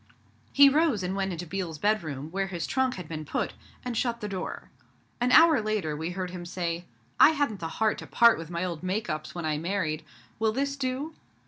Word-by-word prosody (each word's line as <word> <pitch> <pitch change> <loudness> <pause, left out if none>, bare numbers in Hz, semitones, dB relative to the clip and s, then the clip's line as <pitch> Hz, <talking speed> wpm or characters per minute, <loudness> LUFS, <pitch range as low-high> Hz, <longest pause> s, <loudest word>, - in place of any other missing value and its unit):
He 280 0 +8
rose 280 - +3
and 185 +1 -2
went 195 -1 -1
into 175 0 -5
Biel's 175 -2 -4
bedroom, 155 -7 -1
where 195 +1 -1
his 175 -4 -4
trunk 260 -1 0
had 180 -4 -7
been 155 -1 -5
put, 150 - -2 0.3
and 245 -1 -3
shut 235 0 0
the 210 - -4
door. 190 -2 -5 0.5
An 245 +1 +1
hour 320 -5 +7
later, 210 -8 -1
we 160 +3 -3
heard 180 0 -4
him 180 -1 -6
say, 175 -1 -3 0.3
'I - - +9
hadn't 285 -10 0
the 165 - -3
heart 220 -1 +1
to - - -9
part 235 -4 +5
with 165 -1 -7
my 170 +1 -2
old 170 -4 -4
make 185 +1 -2
ups 155 +1 -5
when 170 -2 -4
I 155 -1 0
married. 165 -3 -2 0.4
Will 220 -1 +2
this 275 +3 -1
do?' 275 +3 -3
190 Hz, 215 wpm, -28 LUFS, 170-235 Hz, 0.5 s, I